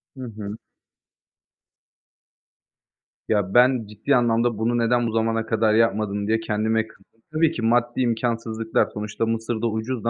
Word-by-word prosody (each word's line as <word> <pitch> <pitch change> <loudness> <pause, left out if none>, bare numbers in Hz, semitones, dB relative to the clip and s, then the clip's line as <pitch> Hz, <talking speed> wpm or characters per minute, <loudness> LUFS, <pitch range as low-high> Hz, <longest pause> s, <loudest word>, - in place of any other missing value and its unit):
Hı 130 - -8
hı. 105 0 -6 2.7
Ya, 100 -3 0
ben 125 -1 +4
ciddi 105 +7 0
anlamda 120 -1 +2
bunu 115 +2 0
neden 120 0 +2
bu - - -2
zamana 115 0 0
kadar 110 -1 +1
yapmadım 105 -2 +1
diye 110 +1 +2
kendime 110 0 0
kızdım. 110 +1 -24
Tabii 160 0 +2
ki 125 - -5
maddi 120 +2 +1
imkânsızlıklar, 115 -2 0
sonuçta 105 +2 -3
Mısır'da 115 0 -2
ucuzdu 115 +1 -2
115 Hz, 130 wpm, -23 LUFS, 110-120 Hz, 2.7 s, ben